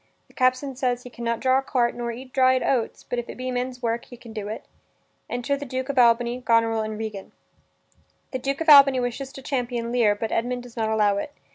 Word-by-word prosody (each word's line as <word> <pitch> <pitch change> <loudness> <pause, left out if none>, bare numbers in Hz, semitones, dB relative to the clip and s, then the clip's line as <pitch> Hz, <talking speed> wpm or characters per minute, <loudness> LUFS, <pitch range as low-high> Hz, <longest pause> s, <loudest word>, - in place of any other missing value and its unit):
The - - -21
captain 255 +1 +1
says 245 -1 -1
he 250 - -10
can 235 - -9
not 235 -1 -1
draw 260 +2 +3
a - - -2
cart 245 -3 0
nor 240 -1 -4
eat 255 +2 -10
dried 260 -1 +4
oats, 245 -4 -1
but 245 - -3
if 240 - -6
it - - -8
be 255 0 -3
men's 250 0 -3
work 230 0 -1
he 245 - -12
can 230 -1 -12
do 210 -2 -5
it. 215 - -6 0.6
Enter 245 +3 -1
the 280 - -6
Duke 260 0 -4
of 275 -2 +1
Albany, 240 +1 +3
Goneril, 230 -2 +2
and 215 0 -4
Regan. 215 -3 -6 1.0
The 260 - -3
Duke 275 +3 -2
of 325 - +1
Albany 275 -3 +8
wishes 250 +2 -3
to 270 - -10
champion 245 -3 -2
Lear, 230 -4 +3
but 220 +2 -4
Edmund 245 +2 -1
does 245 -2 -13
not 220 -2 -1
allow 210 -2 +2
it. 285 +8 -4
245 Hz, 235 wpm, -24 LUFS, 230-260 Hz, 1.0 s, Albany